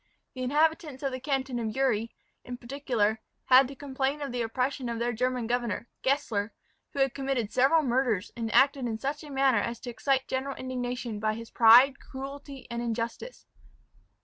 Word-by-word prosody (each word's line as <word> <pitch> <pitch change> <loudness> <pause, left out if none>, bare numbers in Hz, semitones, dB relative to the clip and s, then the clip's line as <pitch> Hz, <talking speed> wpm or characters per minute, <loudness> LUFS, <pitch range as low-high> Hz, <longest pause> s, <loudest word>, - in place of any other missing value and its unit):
The 255 - -7
inhabitants 300 +1 +1
of 275 - 0
the 255 - -4
canton 265 -2 -2
Uri, 230 -2 0 0.3
in 245 0 -7
particular, 240 -4 -1 0.3
had 260 +1 +7
to 275 - -9
complain 270 +1 -2
of 285 -3 -4
the 245 0 -2
oppression 250 +2 -2
of 235 - -3
their 240 +1 -1
German 250 +1 -1
governor, 240 -1 -2
Gessler, 235 -7 0 0.4
who - - -12
had 270 -2 +2
committed 270 -6 -2
several 280 +5 +4
murders, 245 -6 0
and 225 -2 -3
acted 270 0 +4
in 220 -1 -2
such 280 +6 -3
a 300 - -10
manner 270 -4 +3
as 235 +2 -3
to 245 - -6
excite 265 +2 0
general 265 +1 -2
indignation, 245 -3 -4
by 215 0 0
his 230 0 -9
pride, 245 +4 +7
cruelty, 275 0 -8
and 235 0 -3
injustice. 235 - -4
255 Hz, 175 wpm, -28 LUFS, 235-275 Hz, 0.4 s, had